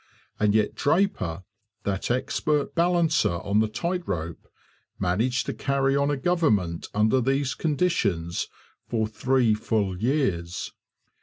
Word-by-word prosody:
And 105 0 +3
yet 110 -1 +2
Draper, 140 - 0 0.4
that 100 -1 -2
expert 140 +4 0
balancer 170 - +2
on 100 +4 0
the 110 - +3
tight 175 +11 -2
rope, 85 -3 -4 0.5
managed 110 +8 0
to - - -3
carry 135 -1 +1
on 140 0 +2
a 145 - 0
government 130 - +1
under 110 +5 +3
these 135 +2 +1
conditions 135 - 0 0.4
for 110 -2 +1
three 120 +1 +2
full 105 -3 -1
years. 95 - -1
115 Hz, 125 wpm, -25 LUFS, 100-145 Hz, 0.5 s, And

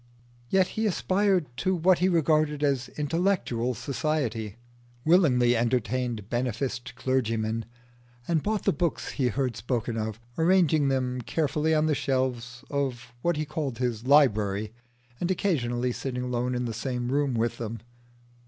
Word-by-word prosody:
Yet 190 -1 +3
he 220 0 -1
aspired 190 -2 +2
to 185 +4 +1
what 180 +1 +3
he 185 +2 +3
regarded 155 -3 +2
as 135 -3 +1
intellectual 150 -7 0
society, 125 -8 -2 0.5
willingly 130 -8 +4
entertained 120 -2 -1
beneficed 120 +1 -2
clergymen, 115 -4 -1 0.6
and 165 -3 +2
bought 215 +3 -1
the - - +2
books 165 +2 -1
he 130 - 0
heard 130 -1 -1
spoken 115 +1 -2
of, 110 0 -3 0.2
arranging 160 -4 +4
them 130 -2 0
carefully 155 +4 0
on 155 0 +3
the 155 - +2
shelves 130 -3 -2
of 130 -5 -2
what 170 +1 +1
he 155 - -1
called 145 -5 -3
his 120 -1 -2
library, 110 -7 +3 0.5
and 175 - -1
occasionally 125 -11 0
sitting 125 0 -4
alone 125 0 -1
in 125 0 -1
the 115 - -3
same 125 +1 -3
room 140 -2 +1
with 115 +1 -1
them. 115 -1 -4
130 Hz, 145 wpm, -27 LUFS, 120-155 Hz, 0.6 s, willingly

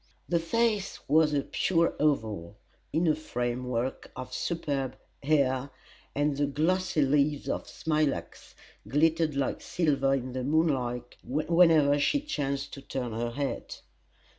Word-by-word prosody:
The 170 - +2
face 210 +3 0
was 155 +1 +4
a 145 -2 +1
pure 170 -2 +1
oval, 110 - 0 0.3
in 165 +2 +1
a 155 - +5
frame 125 -5 -3
work 125 +1 -3
of 130 0 -7
superb 140 -4 -2 0.2
hair, 140 -2 +2 0.5
and 145 0 +1
the 145 0 +1
glossy 160 +3 +1
leaves 145 +1 +1
of - - -2
smilax 150 - -2 0.3
glittered 155 +4 +2
like 140 -1 -1
silver 140 -5 +1
in 130 -1 -4
the 130 0 -3
moonlight 130 -5 0
whenever 155 0 +4
she 285 - +2
chanced 140 - -3
to 140 - -7
turn 130 -3 -4
her 120 +1 -2
head. 140 +4 -4
145 Hz, 135 wpm, -29 LUFS, 130-160 Hz, 0.5 s, a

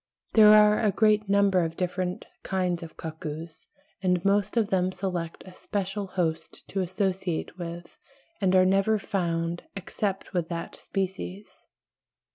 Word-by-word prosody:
There 215 -2 +8
are 210 0 +6
a 215 - +3
great 210 0 +3
number 200 -2 +4
of 165 0 -4
different 180 0 -2 0.2
kinds 180 -2 -1
of 165 -2 -10
cuckoos, 160 0 -7 0.3
and 180 -2 +1
most 205 +3 +2
of 220 -3 +2
them 185 -1 +2
select 180 -4 -4
a 185 - -12
special 200 +1 -3
host 175 -4 -3
to 195 - -1
associate 185 -1 -2
with, 170 0 -7 0.4
and 190 -1 +3
are 185 0 +6
never 195 +3 +3
found 170 -4 -2
except 195 0 -3
with 175 -3 -1
that 170 -1 -5
species. 190 +1 -5
185 Hz, 140 wpm, -27 LUFS, 175-200 Hz, 0.4 s, There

